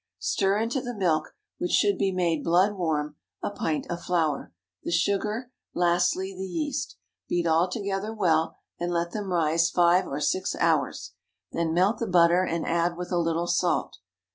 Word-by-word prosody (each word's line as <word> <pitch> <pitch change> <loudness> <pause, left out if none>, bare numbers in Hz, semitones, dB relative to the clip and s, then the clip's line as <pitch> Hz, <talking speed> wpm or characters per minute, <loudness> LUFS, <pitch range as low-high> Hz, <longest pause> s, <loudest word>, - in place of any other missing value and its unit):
Stir 195 +1 +1
into 230 +4 -1
the 245 -1 -5
milk, 165 -6 0 0.2
which 180 - -1
should 205 -1 +3
be 195 - +2
made 170 -4 0
blood 185 +5 +3
warm, 150 -5 -2 0.3
a - - -1
pint 160 -6 -2
of 175 0 -4
flour, 160 - -1 0.3
the - - -5
sugar, 210 +7 0 0.2
lastly 180 +2 +1
the 190 +1 -5
yeast. 290 - -3 0.3
Beat 175 -1 0
all 165 +2 +3
together 200 +1 -3
well, 165 -7 +1 0.2
and 175 0 -2
let 170 0 -1
them 205 -2 -4
rise 165 -1 +2
five 175 +1 +3
or 140 - -4
six 185 +5 0
hours. - - 0 0.4
Then 165 -1 -1
melt 190 +5 +2
the 230 - -2
butter, 175 0 +4
and 170 -2 -2
add 170 +1 0
with 180 +1 -6
a 175 - +2
little 165 0 0
salt. - - 0
175 Hz, 170 wpm, -26 LUFS, 170-195 Hz, 0.4 s, butter